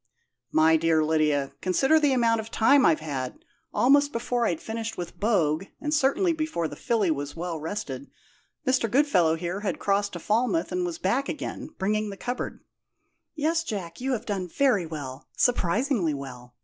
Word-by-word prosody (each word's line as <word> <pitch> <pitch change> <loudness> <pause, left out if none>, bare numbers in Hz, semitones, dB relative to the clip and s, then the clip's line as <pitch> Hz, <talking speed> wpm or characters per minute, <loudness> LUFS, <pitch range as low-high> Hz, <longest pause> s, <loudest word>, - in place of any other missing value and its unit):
"My 160 +1 +5
dear 160 -1 +2
Lydia, 150 -3 +1
consider 270 - +3
the 295 -2 +3
amount 230 -3 +3
of 220 0 -6
time 260 +5 +5
I've 160 -2 +2
had! 135 -5 -5 0.3
Almost 285 +6 +4
before 240 0 0
I'd 165 - -1
finished 225 0 -5
with 175 - -7
Bogue, 185 -6 +1
and 300 0 -2
certainly 305 +5 +2
before 310 - -2
the - - -8
filly 215 -7 +1
was 145 -1 -3
well 170 -1 -4
rested, 150 -5 -5 0.6
Mr. 255 -3 +2
Goodfellow 200 - +3
here 175 +3 -3
had 205 -1 -2
crossed 200 0 0
to 175 - -5
Falmouth 240 - 0
and 180 0 -1
was 170 -2 -4
back 240 +11 0
again, 300 - -6
bringing 210 +2 0
the 200 - -7
cupboard 245 +4 -4 0.4
" - - -46 0.3
"Yes, 325 +2 +1
Jack; 190 - -5
you 265 +1 0
have 225 - -3
done 195 -4 -2
very 210 -4 +2
well 140 -4 -7
surprisingly 210 - +1
well. 125 -3 -9
200 Hz, 175 wpm, -26 LUFS, 160-250 Hz, 0.6 s, My